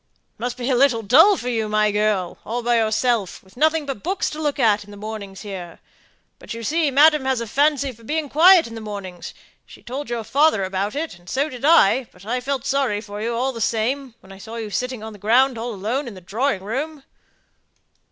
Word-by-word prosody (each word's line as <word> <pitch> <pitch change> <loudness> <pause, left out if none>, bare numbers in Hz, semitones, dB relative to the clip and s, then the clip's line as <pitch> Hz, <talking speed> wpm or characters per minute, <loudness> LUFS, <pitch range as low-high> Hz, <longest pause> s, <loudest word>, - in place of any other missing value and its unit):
"It - - -45
must 245 +1 -3
be 245 -1 -4
a - - +3
little 245 -3 +3
dull 325 - +6
for 245 - -6
you, 225 -3 -1
my 215 0 +2
girl, 210 -4 0
all 240 +2 -4
by 240 0 +2
yourself, 220 -2 0
with 190 - -22
nothing 310 +3 +2
but 275 -7 -5
books 380 +2 -1
to 310 - -6
look 295 -2 -1
at, 220 -5 +3
in 205 - -17
the 205 - -11
mornings 205 -2 -7
here; 185 -5 -8 0.6
but - - -8
you 230 - -7
see, 315 +5 +1
madam 295 +1 +5
has 265 -2 +1
a 235 - -3
fancy 280 +3 +1
for 230 -1 -18
being 305 +5 -2
quiet 340 +5 +6
in 230 - -9
the 225 - -7
mornings: 195 -5 -7 0.3
she - - -16
told 270 +3 -6
your 235 -1 -3
father 280 -4 +2
about 195 +4 -2
it, 300 - -4
and 175 - -15
so 280 +4 0
did 250 -2 -10
I, 270 -5 +5
but 180 +2 -17
I 245 +3 -1
felt 270 -1 -3
sorry 270 -7 0
for 205 -1 -8
you 230 +1 -2
all 255 +3 0
the 230 - -7
same, 240 +4 -1
when 190 - -16
I 195 - -12
saw 225 +3 -9
you 220 -2 -5
sitting 250 0 -3
on 220 0 -7
the 205 - -13
ground 245 +6 +3
all 235 +2 -4
alone 230 +9 -2
in 225 - -8
the 185 - -11
drawing 205 +3 -1
room." 275 +7 -4
235 Hz, 230 wpm, -22 LUFS, 210-275 Hz, 0.6 s, dull